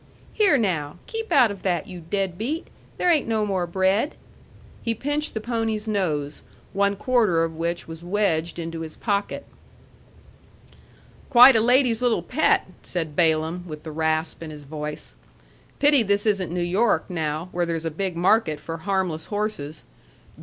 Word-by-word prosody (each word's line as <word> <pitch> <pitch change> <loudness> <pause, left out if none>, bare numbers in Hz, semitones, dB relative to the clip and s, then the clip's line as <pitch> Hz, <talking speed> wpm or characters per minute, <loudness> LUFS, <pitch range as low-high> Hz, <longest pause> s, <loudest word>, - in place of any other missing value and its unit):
Here, 400 -9 +4
now! 175 - -1
Keep 450 0 -5
out 250 -6 +5
of 200 - -8
that, 175 -4 0
you 180 -2 -9
dead 195 -3 -1
beat! 275 - -3 0.3
There 360 - +3
ain't 305 -7 +2
no 220 -2 +1
more 190 -3 -1
bread." 190 - +1 0.7
He 230 -1 -1
pinched 290 +5 -2
the - - 0
pony's 225 -1 -2
nose, 155 -9 -1 0.3
one 200 +1 +2
quarter 210 -7 +2
of 165 -1 -3
which 170 +1 -3
was 165 +1 -9
wedged 175 -4 0
into 165 -1 -5
his 160 -1 -6
pocket. 205 -2 -2 1.8
"Quite 250 0 +9
a 220 - +4
lady's 245 0 +3
little 235 -8 +1
pet!" 280 - +2 0.2
said 160 -4 -4
Balaam, 160 +1 +1
with 155 -2 -8
the 160 - -7
rasp 160 +1 -1
in 165 - -6
his 150 -1 -10
voice. 150 +1 -7 0.6
"Pity 290 -2 +5
this 205 -1 +1
isn't 195 -6 +1
New 180 0 -2
York, 200 +6 +1
now, 160 -1 -3
where 175 -1 -1
there's 165 -1 -3
a 165 - -1
big 185 +2 -3
market 175 -3 +2
for 165 +2 -6
harmless 185 -2 -2
horses. 205 -8 -3
185 Hz, 160 wpm, -24 LUFS, 165-225 Hz, 1.8 s, Quite